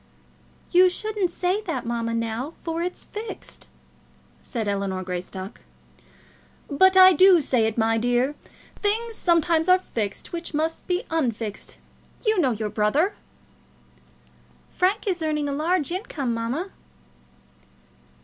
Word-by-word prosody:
"You 365 +1 +6
shouldn't 420 0 -1
say 365 +4 -1
that, 260 -8 -3
mamma, 230 -1 -2
now; 230 +7 -3
for 330 0 -2
it's 360 +1 -4
fixed," 435 +2 -8 0.7
said 225 -4 -4
Ellinor 195 -2 -2
Greystock. 185 +2 -6 1.1
"But 375 +6 +4
I 375 0 +9
do 370 -1 +7
say 250 -6 +2
it, 220 - -4
my 225 0 +2
dear. 245 +4 +1 0.5
Things 450 +3 -1
sometimes 335 -1 +2
are 365 - +7
fixed 220 - -5
which 340 -2 -5
must 320 +2 -2
be 360 +3 0
unfixed. 230 -9 -2 0.5
You 435 -2 +3
know 285 -7 +3
your 215 -3 -3
brother." 285 - +1 1.6
"Frank 385 +4 +1
is 365 -4 -1
earning 300 -2 -1
a - - -2
large 315 +1 0
income, 295 - -3
mamma." 250 +12 -3
310 Hz, 125 wpm, -24 LUFS, 230-365 Hz, 1.6 s, I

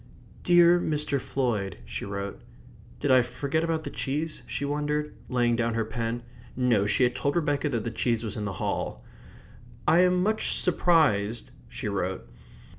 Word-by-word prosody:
"Dear 175 0 +6
Mr. 150 -4 0
Floyd," 110 -8 -1
she - - -5
wrote. 100 0 -5 0.6
"Did - - +1
I 130 -1 +7
forget 135 +6 -2
about 165 -1 -1
the - - -5
cheese?" 150 +3 -3
she 145 - -3
wondered, 150 +1 -1 0.2
laying 120 -2 +2
down 115 -1 0
her 115 -1 0
pen. 115 +1 -3 0.3
No, 120 -6 +2
she 130 - +3
had 125 0 +3
told 140 - -1
Rebecca 150 -3 +1
that 115 -5 -1
the 115 - -3
cheese 115 0 0
was 110 - -4
in 105 - -3
the 100 - -3
hall. - - -3 0.8
"I 170 - +6
am 180 0 +4
much 220 +2 +1
surprised..." 140 - +2 0.2
she - - -5
wrote. 95 -6 -2
130 Hz, 165 wpm, -27 LUFS, 115-155 Hz, 0.8 s, I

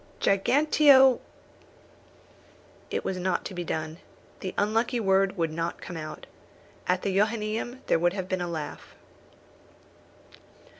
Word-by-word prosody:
"Giganteo 270 +4 +5 0.8
" - - -28
It - - -2
was 190 - -2
not 180 0 -1
to - - -5
be 175 -1 -4
done. 160 0 -4 0.4
The 185 - -5
unlucky 225 +4 +1
word 195 -1 +2
would 165 -2 0
not 165 +1 -3
come 175 - -8
out. 155 -1 -7 0.6
At 180 0 +1
the 195 -1 -1
Johannæum 220 +4 -1
there - - +2
would 175 +1 +2
have 190 -2 -4
been 185 -1 -2
a 175 - -2
laugh. 155 -3 -6
190 Hz, 135 wpm, -27 LUFS, 175-220 Hz, 0.8 s, Giganteo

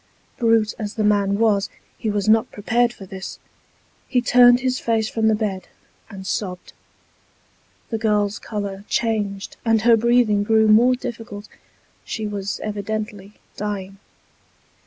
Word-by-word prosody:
Brute 225 -3 +3
as 210 -1 -5
the 215 - -1
man 200 -1 +2
was, 210 -2 +2 0.3
he 220 - -3
was 205 -1 -1
not 220 +2 +3
prepared 235 +3 +1
for 195 - -11
this. 190 0 -8 0.7
He 250 - +2
turned 245 0 +6
his 255 0 0
face 225 -2 0
from 220 0 0
the 220 - +4
bed, 200 -4 -3 0.4
and 195 -3 -9
sobbed. 180 -1 -4 1.2
The 225 - -1
girl's 210 -2 +1
colour 200 -2 -5
changed, 205 -4 -2
and 225 -2 +2
her 235 0 +6
breathing 230 -2 +3
grew 220 +1 +3
more 235 +4 +5
difficult. 225 -4 -7 0.6
She 220 - -4
was 200 -1 -4
evidently 210 -1 -5 0.2
dying. 195 -2 -5
215 Hz, 135 wpm, -21 LUFS, 205-225 Hz, 1.2 s, turned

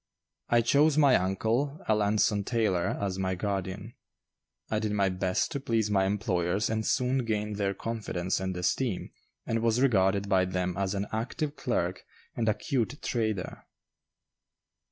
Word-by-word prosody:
I 120 0 +5
chose 145 +5 +3
my 140 -4 +6
uncle, 115 - 0
Alanson 105 -1 +2
Taylor, 105 -6 0
as 95 -2 -2
my 95 -1 0
guardian. 100 +2 -3 0.8
I 110 - +1
did 110 -1 -2
my 100 -2 +2
best 95 0 -1
to 140 - -2
please 115 -5 0
my 95 -2 +3
employers 100 -1 0
and 110 0 0
soon 125 +3 +1
gained 105 -2 -2
their 100 -1 0
confidence 95 -5 -2
and 95 -1 -3
esteem 100 +4 -1 0.3
and 115 - 0
was 115 +1 +2
regarded 100 -6 +3
by 95 -2 +3
them 90 -1 -2
as 100 +1 -1
an 100 +1 -1
active 140 +7 -2
clerk - - -2 0.3
and 115 -2 +1
a 105 - +2
'cute 135 +1 -2
trader. 110 -6 -2
105 Hz, 150 wpm, -29 LUFS, 95-115 Hz, 0.8 s, my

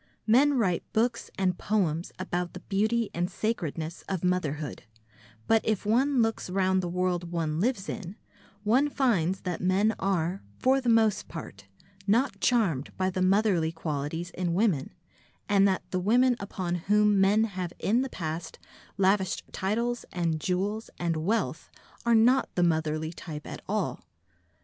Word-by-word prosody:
Men 275 +6 +5
write 185 -7 +1
books 230 +1 0
and 185 -2 0
poems 180 -6 0
about 180 -2 -3
the 180 - -8
beauty 215 +3 0
and 175 +1 -1
sacredness 170 -6 -3
of 190 -3 -2
motherhood, 155 -6 -1 0.6
but 225 -1 +4
if 215 -2 -1
one 250 +4 +3
looks 225 -4 -2
round 190 0 +2
the 180 - -3
world 180 -1 -1
one 160 -2 -1
lives 215 -1 0
in, 195 -2 -6 0.5
one 255 +8 +3
finds 195 - +1
that 180 -2 -3
men 195 +4 +2
are, 185 -1 0 0.2
for 265 +1 +3
the 245 - 0
most 220 -3 +3
part, 100 - -9 0.4
not 235 +7 +2
charmed 190 - +1
by 185 0 +1
the 185 - -2
motherly 185 -4 +3
qualities 160 +1 -4
in 175 -2 -2
women, 185 -9 +1 0.6
and 200 -1 +4
that 190 -1 0
the 185 - 0
women 245 +6 +3
upon 190 -3 -4 0.2
whom 210 -1 +4
men 205 +3 +4
have 185 -5 -3
in 230 +5 +2
the 265 - -2
past 160 -4 -5 0.4
lavished 190 -1 +2
titles 235 +5 -1
and 165 -3 -1
jewels 200 +6 -1
and 170 -1 -1
wealth 190 +9 -1 0.4
are 235 - +5
not 245 +4 +4
the 175 - +2
motherly 160 -1 0
type 155 -3 -8
at - - -7
all. - - -1
190 Hz, 155 wpm, -28 LUFS, 170-220 Hz, 0.6 s, Men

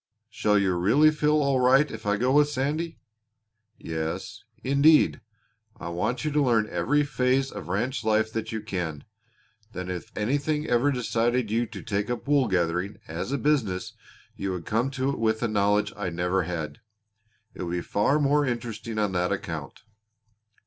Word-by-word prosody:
"Shall 105 -1 +2
you 95 -2 +2
really 115 +13 +4
feel 150 0 +2
all 140 -2 +2
right 135 +4 +4
if 110 -1 -7
I 105 0 +2
go 125 +4 +1
with 145 +1 +4
Sandy?" 150 +4 -2 0.8
"Yes, 80 0 -5 0.2
indeed. 140 +4 +4 0.6
I 85 - -5
want 90 - -2
you 155 - 0
to 150 0 +2
learn 115 -5 +2
every 135 +13 +2
phase 130 0 +1
of 75 - -8
ranch 120 +8 -1
life 110 0 +1
that 115 0 -3
you 110 -1 -3
can. 90 -8 -4 0.7
Then 90 0 -4
if 90 -1 -6
anything 145 +7 0
ever 120 +3 +2
decided 120 -2 0
you 115 +2 +1
to 105 -3 -9
take 105 -1 -2
up 120 +2 -4
wool 140 -3 +3
growing 90 +1 0
as 80 +10 -4
a 140 - +1
business 120 -13 0 0.4
you 95 -1 -3
would 90 -2 -6
come 115 +5 0
to 135 0 -1
it 140 - -5
with 110 0 +1
a - - +2
knowledge 105 -1 +1
I 105 -3 -3
never 90 +2 0
had. 80 -4 -4 0.7
It - - -9
would 85 -1 -3
be 90 - -1
far 105 +11 +1
more 145 0 +3
interesting 115 -3 -4
on 105 -2 +1
that 90 -1 0
account. - - -5
115 Hz, 175 wpm, -26 LUFS, 95-135 Hz, 0.8 s, really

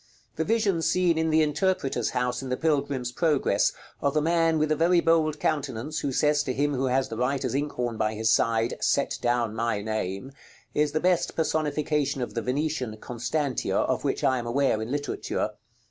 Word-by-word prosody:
The 160 - 0
vision 205 -4 +1
seen 180 0 +2
in 160 0 +1
the 155 0 +4
interpreter's 150 - 0
house 125 0 -1
in 135 - -6
the 125 - -1
Pilgrim's 140 -5 0
Progress, 150 0 +2 0.3
of 140 0 0
the - - +4
man 165 0 +2
with 155 0 +1
a - - +4
very 170 +3 +4
bold 160 -2 +2
countenance, 145 0 -2
who 140 - -2
says 150 +2 +2
to 130 -3 -2
him 145 +1 +1
who 135 0 0
has 130 +1 +1
the 115 - -5
writer's 130 +1 -1
ink 145 +2 -1
horn 120 -2 -2
by 110 0 0
his 110 +1 +1
side, 115 0 +2
"Set 140 - +1
down 120 -2 +1
my 115 -2 -1
name," 110 +2 -3 0.4
is 150 0 +1
the 155 - +1
best 180 +1 +1
personification 150 -3 0
of - - -6
the 115 - -2
Venetian 130 -2 -2
"Constantia" 125 +5 -2
of - - 0
which - - -1
I 130 -1 +3
am 120 - -5
aware 120 -3 +1
in 110 - -4
literature. 145 +1 -2
140 Hz, 190 wpm, -26 LUFS, 120-155 Hz, 0.4 s, the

